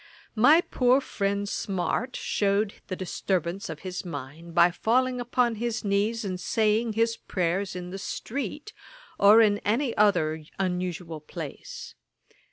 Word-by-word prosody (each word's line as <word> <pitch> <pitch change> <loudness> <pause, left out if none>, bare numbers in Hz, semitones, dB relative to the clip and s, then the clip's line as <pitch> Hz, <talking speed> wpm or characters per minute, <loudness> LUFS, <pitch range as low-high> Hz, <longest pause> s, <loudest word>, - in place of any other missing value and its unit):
My 285 +9 +6
poor 255 -4 +3
friend 200 -5 -2
Smart 200 +6 -2
shewed 200 +1 0
the 185 - -3
disturbance 185 0 -2
of 160 -2 -7
his 180 -1 -5
mind, 160 +1 -8
by 175 +1 +6
falling 250 +6 +1
upon 240 -1 +1
his 235 0 -2
knees, 210 +3 0
and 185 -2 -3
saying 220 +3 +1
his 230 +1 +1
prayers 185 +1 -2
in 180 0 -6
the 195 - -6
street, 280 - -5 0.5
or 210 +3 +8
in 205 -1 +3
any 235 +5 0
other 160 -7 +2
unusual 180 -3 -2
place. 150 - -8
200 Hz, 135 wpm, -27 LUFS, 180-230 Hz, 0.5 s, or